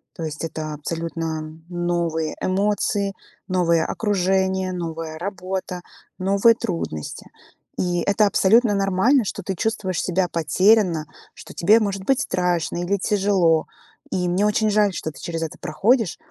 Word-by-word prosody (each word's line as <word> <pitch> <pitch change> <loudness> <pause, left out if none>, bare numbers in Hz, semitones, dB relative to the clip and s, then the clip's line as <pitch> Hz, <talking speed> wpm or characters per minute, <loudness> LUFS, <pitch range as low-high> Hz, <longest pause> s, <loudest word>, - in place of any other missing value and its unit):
То 165 - -6
есть, 155 +1 -5
это 155 -1 -4
абсолютно 165 +1 -4 0.3
новые 170 -3 -1
эмоции, 200 +1 0 0.3
новое 170 -4 +2
окружение, 190 -2 0
новая 165 -2 -5
работа, 185 -1 -4 0.4
новые 200 +5 +4
трудности. 170 - -5 0.5
И 175 -1 0
это 205 +1 +3
абсолютно 215 +3 +4
нормально, 200 +7 +3
что 200 0 -4
ты 190 - -3
чувствуешь 195 -3 -1
себя 180 0 +1
потерянно, 170 +1 +3 0.3
что - - -12
тебе 210 +6 +5
может 195 -2 -2
быть 270 +2 +2
страшно 175 -2 -1
или 200 +3 0
тяжело. 195 -5 +2 0.4
И 180 -1 0
мне 190 +4 +2
очень 215 +1 +2
жаль, 205 -2 +3
что 160 - -4
ты - - -14
через 165 -1 -4
это 160 - -6
проходишь. 205 +7 +1
185 Hz, 135 wpm, -22 LUFS, 165-200 Hz, 0.5 s, тебе